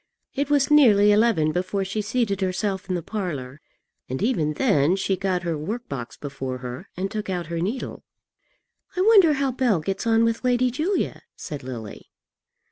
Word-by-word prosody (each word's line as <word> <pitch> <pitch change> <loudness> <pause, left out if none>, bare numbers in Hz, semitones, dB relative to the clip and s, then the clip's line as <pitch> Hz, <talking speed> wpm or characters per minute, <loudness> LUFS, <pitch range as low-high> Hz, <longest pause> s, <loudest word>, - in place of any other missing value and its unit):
It 280 +1 -1
was 285 0 +2
nearly 210 -9 +6
eleven 205 -8 +3
before 185 +3 -1
she 200 +3 -2
seated 210 -2 -1
herself 190 +1 -2
in 185 - 0
the 170 - -3
parlour, 150 -10 -5 0.5
and 130 - -3
even 160 -11 +1
then 175 - +2
she 195 0 0
got 185 -2 -1
her 170 -2 -1
work 210 +11 -5
box 125 -3 -6
before 135 -3 -5
her 125 0 -8
and 195 +2 -2
took 215 -2 -4
out 180 -2 -2
her 165 - -1
needle. 210 +10 -4 0.9
"I - - +2
wonder 390 -6 +6
how 275 -1 0
Bell 245 -7 +1
gets 195 +8 -3
on 225 0 +4
with 230 +1 0
Lady 250 0 +2
Julia," 325 +10 -1
said 145 -2 -7
Lily. 120 -5 -8
195 Hz, 175 wpm, -24 LUFS, 155-240 Hz, 0.9 s, nearly